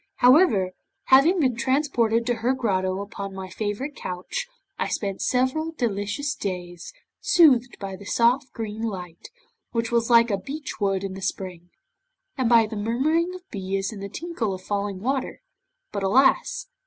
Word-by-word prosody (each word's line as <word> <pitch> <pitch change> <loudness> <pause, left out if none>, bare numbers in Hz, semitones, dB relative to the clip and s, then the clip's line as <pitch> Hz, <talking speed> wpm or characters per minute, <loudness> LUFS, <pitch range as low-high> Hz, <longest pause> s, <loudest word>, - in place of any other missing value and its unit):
However, 245 - +5 0.4
having 300 +8 +6
been 260 -6 +2
transported 235 -4 +1
to 245 - +1
her 250 +3 +2
grotto 190 -6 0
upon 200 -1 -7
my 190 -1 -6
favourite 215 +9 -3
couch, 180 - -5 0.3
I - - 0
spent 195 -2 -3
several 260 +6 0
delicious 235 +3 -2
days, 180 - -5 0.3
soothed 255 -8 +4
by 195 -1 -5
the 200 - -12
soft 245 +5 +2
green 220 -1 -5
light, 180 -6 -6 0.4
which 230 -1 -1
was 235 0 +1
like 235 -1 +6
a 200 - 0
beech 290 +6 -7
wood 195 -2 0
in 195 -1 -4
the 190 - -8
spring, 180 -2 -5 0.7
and 255 -4 0
by 230 -2 +6
the 215 +1 -7
murmuring 305 - 0
of 365 0 -12
bees 195 0 -2
and 200 - -8
the 200 - -5
tinkle 255 - -3
of 185 - -11
falling 200 -1 -3
water. 265 +3 -2 0.5
But 200 - -3
alas! 265 - +3
225 Hz, 160 wpm, -24 LUFS, 195-265 Hz, 0.7 s, having